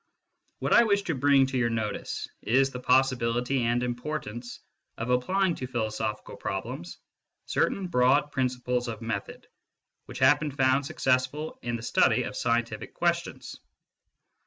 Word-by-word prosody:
What - - 0
I 235 - +8
wish 200 -3 +2
to 170 - -1
bring 140 0 +4
to 130 -1 -2
your 120 -1 +2
notice 110 -2 -3
is 135 +3 +2
the 125 - -6
possibility 125 0 +2
and 120 +1 +1
importance 120 -2 -5 0.4
of 115 +2 -2
applying 185 +9 +2
to 130 - -5
philosophical 110 -3 -3
problems 95 -3 -5 0.5
certain 195 - 0
broad 140 -1 +3
principles 125 -1 -1
of 115 -1 -6
method 115 -3 -5 0.6
which - - -8
have - - +5
been 150 - -2
found 135 0 +2
successful 130 +4 -1
in 120 -1 -2
the 115 - -6
study - - +3
of - - -6
scientific 120 0 -1
questions. - - -2
125 Hz, 140 wpm, -27 LUFS, 115-135 Hz, 0.6 s, I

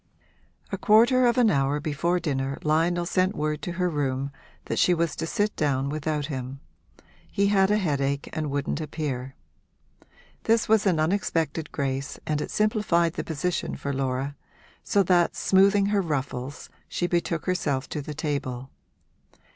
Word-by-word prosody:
A - - -3
quarter 240 +4 +5
of 240 - +2
an 235 -4 +5
hour 140 0 +1
before 160 +4 0
dinner 135 -4 -2
Lionel 165 +3 +2
sent 185 +2 +1
word 150 0 -2
to 175 +4 -4
her 180 +1 0
room 140 -4 -1 0.3
that - - -2
she 180 - +4
was 165 -1 0
to 165 - -3
sit 210 +3 0
down 140 -2 0
without 150 0 -2
him 135 -2 -5 0.7
he 200 0 +2
had 195 -1 +4
a 210 - +3
headache 140 -7 -1
and 155 -2 -2
wouldn't 140 +3 -2
appear. 135 -4 -4 1.1
This 225 0 +3
was 215 -1 +3
an 175 -4 +2
unexpected 160 -3 0
grace 135 0 -3
and 150 -1 -1
it - - -4
simplified 205 -6 +1
the - - -3
position 170 +3 -2
for 140 - -4
Laura; 135 +1 -2 0.5
so 200 - +3
that, 175 -1 +3
smoothing 195 +1 +4
her 200 - +3
ruffles, 140 -4 -4 0.2
she 175 - -2
betook 170 -2 -1
herself 145 -7 -1
to 150 - -3
the 150 +1 -7
table. 135 -4 -3
155 Hz, 155 wpm, -26 LUFS, 140-185 Hz, 1.1 s, quarter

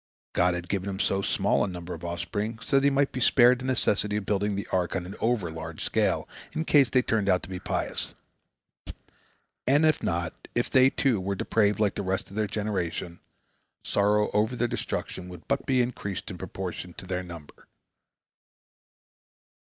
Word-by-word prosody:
God 90 0 +3
had 90 0 -5
given 100 +1 -2
him 95 - -4
so 95 0 +1
small 100 0 +2
a - - 0
number 90 -1 -6
of 85 - -9
offspring 85 +6 -3
that 135 0 +5
he 140 - +6
might 140 0 +2
be 130 - -4
spared 125 0 +5
the 130 - -6
necessity 105 -5 +1
of 105 - -3
building 105 0 0
the 100 - -3
ark 90 -2 0
on 90 -2 -2
an 95 - -7
overlarge 85 -9 -2
scale - - +1 0.3
in 160 - -2
case 140 -6 +5
they 125 +2 +3
turned 105 -4 +1
out 90 -1 +3
to 90 - -9
be 90 -1 -5
pious. - - -3 1.5
And 145 +4 +5
if 155 - +3
not, 85 -1 -1 0.2
if 120 - 0
they, 130 -1 +6
too, 130 -7 +1
were 100 +1 -1
depraved 105 +1 +1
like 105 -2 +2
the - - -3
rest 95 -1 -2
of - - -10
their 110 -1 +1
generation, 95 -5 -3 0.6
sorrow 105 +1 +2
over 110 +4 +1
their 120 0 +1
destruction 90 -5 -4
would 90 -2 -11
but 140 0 -1
be 130 -2 +4
increased 105 -6 -4
in 90 - -8
proportion 90 -1 -6
to - - -8
their 90 0 -2
number. 85 -4 -11
100 Hz, 185 wpm, -27 LUFS, 90-120 Hz, 1.5 s, he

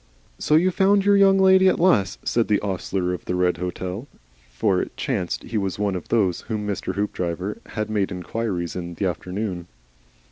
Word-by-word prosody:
"So 150 - +2
you 180 +4 +4
found 195 +1 +3
your 205 0 +5
Young 195 -1 +5
Lady 190 0 +6
at - - +3
last," 105 - +2
said 115 -1 +1
the 105 - +2
ostler 95 -2 -2
of 90 - -7
the 90 - -2
Red 90 -1 +1
Hotel; 90 +6 -5 0.4
for - - +1
it - - -7
chanced 90 -2 -2
he 110 - -2
was 95 -2 -2
one 100 -1 0
of 90 - -5
those 95 -7 +1
of - - -22
whom 105 -2 -3
Hoopdriver 95 -1 -3
had 110 -1 -3
made 105 -3 -1
inquiries 90 -1 -3
in 85 -1 -5
the 100 - -2
afternoon. 90 0 -3
100 Hz, 185 wpm, -23 LUFS, 90-115 Hz, 0.4 s, Lady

